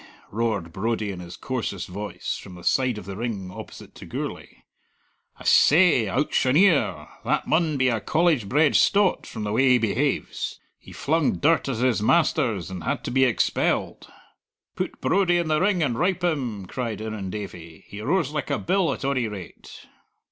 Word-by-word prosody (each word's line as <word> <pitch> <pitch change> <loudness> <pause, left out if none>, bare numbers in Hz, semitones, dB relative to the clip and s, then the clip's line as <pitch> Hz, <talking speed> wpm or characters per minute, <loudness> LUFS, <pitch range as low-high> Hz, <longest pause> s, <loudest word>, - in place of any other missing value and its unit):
roared 105 -7 -2
Brodie 110 +1 -1
in 95 - -7
his 85 -1 -9
coarsest 115 -8 -4
voice, 100 +1 -5
from 95 -2 -10
the 90 - -12
side 130 -4 +1
of 105 - -8
the 100 0 -6
ring 105 -4 -4
opposite - - -10
to - - -11
Gourlay. - - -6 0.7
"I - - -12
seh, 155 - +5
owctioner! 145 - +2 0.2
That - - 0
maun 160 -2 +1
be 130 -1 +2
a 115 -3 +1
College 155 - +1
bred 150 +2 +3
stot, 200 -1 +3
from 110 - -6
the 105 - -2
way 130 +5 +3
he 125 - +6
behaves. 125 +5 -1 0.2
He - - -15
flung 160 +1 +1
dirt 160 -1 +2
at 130 - -2
his 125 -3 +1
masters, 115 - +1
and 90 -2 -6
had 125 -1 -2
to - - -4
be 130 +1 +4
expelled." 115 -8 0 0.6
"Put - - -4
Brodie 185 -2 +2
in 170 -2 -1
the 155 +1 +2
ring 190 -3 +2
and 125 -6 0
rowp 180 +4 0
him!" 125 - -1
cried 115 0 -4
Irrendavie. 95 -6 -7
"He 100 +1 -9
roars 150 - 0
like 150 -1 -3
a 140 - +1
bill, 185 -4 +1
at - - -6
ony 130 -4 0
rate." 100 -5 -10
125 Hz, 175 wpm, -24 LUFS, 105-155 Hz, 0.7 s, he